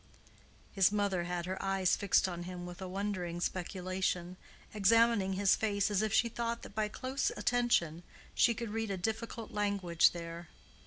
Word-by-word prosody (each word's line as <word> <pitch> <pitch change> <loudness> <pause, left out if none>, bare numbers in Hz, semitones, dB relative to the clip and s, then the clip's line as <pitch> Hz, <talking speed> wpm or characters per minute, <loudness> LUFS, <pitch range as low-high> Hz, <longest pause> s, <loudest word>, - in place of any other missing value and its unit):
His 195 -1 +4
mother 200 -4 0
had 175 -1 -3
her 190 +1 -4
eyes 195 -1 +2
fixed 200 -1 +2
on 175 -2 -5
him 175 0 -6
with 175 +1 -9
a 190 - -4
wondering 185 -3 -3
speculation, 185 0 -2 0.4
examining 215 -1 +3
his 195 0 +3
face 205 -1 0
as 205 0 +2
if 215 -1 0
she 235 - +3
thought 235 0 -3
that - - -10
by 215 -1 0
close 260 +5 -2
attention 235 -10 +1 0.3
she 235 - +4
could 230 -2 -5
read 225 0 -2
a 195 - -2
difficult 220 +3 -4
language 200 -5 +2
there. 170 0 -7
195 Hz, 165 wpm, -32 LUFS, 180-220 Hz, 0.4 s, His